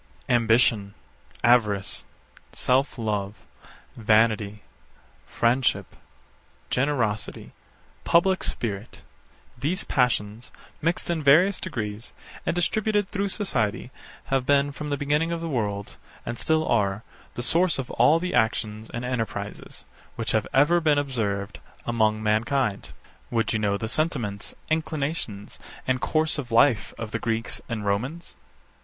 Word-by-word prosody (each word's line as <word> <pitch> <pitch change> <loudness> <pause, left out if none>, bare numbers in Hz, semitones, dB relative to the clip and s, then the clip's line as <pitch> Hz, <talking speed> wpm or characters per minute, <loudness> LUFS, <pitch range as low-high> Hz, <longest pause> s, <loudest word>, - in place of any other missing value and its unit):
Ambition, 115 -3 +3 0.5
avarice, 105 -5 +3 0.5
self 130 +2 +1
love, 105 -3 -3 0.5
vanity, 110 -2 +2 0.6
friendship, 120 +2 +1 0.8
generosity, 125 -6 -1 0.5
public 185 +2 +3
spirit: 105 -1 -4 0.5
these 150 +10 -1
passions, 115 -3 0 0.3
mixed 165 +3 0
in 165 -2 -1
various 165 +8 +5
degrees, 110 - -5 0.3
and - - +1
distributed 205 +3 +1
through 200 0 -1
society, 125 - -1 0.4
have 135 -1 +3
been, 140 +1 +3
from 150 +1 -6
the 145 - 0
beginning 150 +4 +1
of 170 - -2
the 165 - -4
world, 105 -8 -3 0.3
and 120 - -4
still 160 0 +1
are, 105 -2 +1 0.3
the 120 - -3
source 170 +7 +3
of 135 -2 -4
all 125 +7 +5
the 180 +2 -3
actions 110 -2 0
and 120 +1 -4
enterprises, 125 -4 -4 0.3
which 115 -2 -2
have 110 - +1
ever 155 +6 +4
been 150 -2 +3
observed 105 -8 -2 0.3
among 110 -2 +1
mankind. 110 +1 0 0.4
Would 115 -1 0
you 110 - +1
know 100 -1 +1
the 110 - -4
sentiments, 120 -8 -2
inclinations, 155 -9 -3 0.3
and 130 -1 0
course 155 -1 +1
of 125 -5 -6
life 115 -2 +4
of 110 -2 -6
the 115 - -2
Greeks 115 0 -2
and 110 -3 -3
Romans? 125 +12 -2
120 Hz, 125 wpm, -25 LUFS, 110-150 Hz, 0.8 s, various